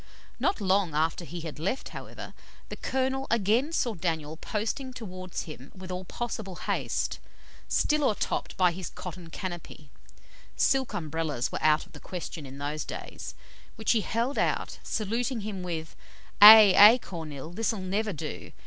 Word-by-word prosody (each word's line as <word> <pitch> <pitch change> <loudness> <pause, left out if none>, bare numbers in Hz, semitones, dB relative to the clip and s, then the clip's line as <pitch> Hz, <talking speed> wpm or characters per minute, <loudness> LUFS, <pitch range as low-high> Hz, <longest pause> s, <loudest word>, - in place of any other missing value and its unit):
Not 385 - +1
long 190 -5 +1
after 160 +3 +1
he 170 +1 -7
had 155 -2 -7
left, 195 - -2
however, - - -9 0.4
the - - -5
colonel 265 +1 -1
again 230 +6 +2
saw 245 -8 0
Daniel 160 -4 -2
posting 225 - -3
towards 185 -6 -6
him 145 -4 -10
with 185 -1 -8
all 180 +1 -4
possible 220 -3 -5
haste, - - -2 0.5
still 300 -1 +2
o'ertopped 215 - -1
by 180 -2 +4
his 180 +1 -6
cotton 180 -2 -8
canopy 170 -6 -7 0.6
(silk 265 -2 +2
Umbrellas 155 -5 -2
were - - -4
out 155 0 +3
of - - -21
the 150 - -11
question 165 -4 -7
in 135 +1 -10
those 145 +2 -3
days), - - -7 0.4
which 220 -1 0
he 225 - +3
held 235 +6 -1
out, - - -1
saluting 230 +3 -2
him 200 -2 -5
with 165 -3 -5 0.2
' - - -26
Hae, 210 -2 +12
hae, 210 +5 +9
Kornil, 160 - -7
this'll 225 +1 0
never 200 +3 -1
do! 160 - -6
185 Hz, 160 wpm, -28 LUFS, 160-225 Hz, 0.6 s, Hae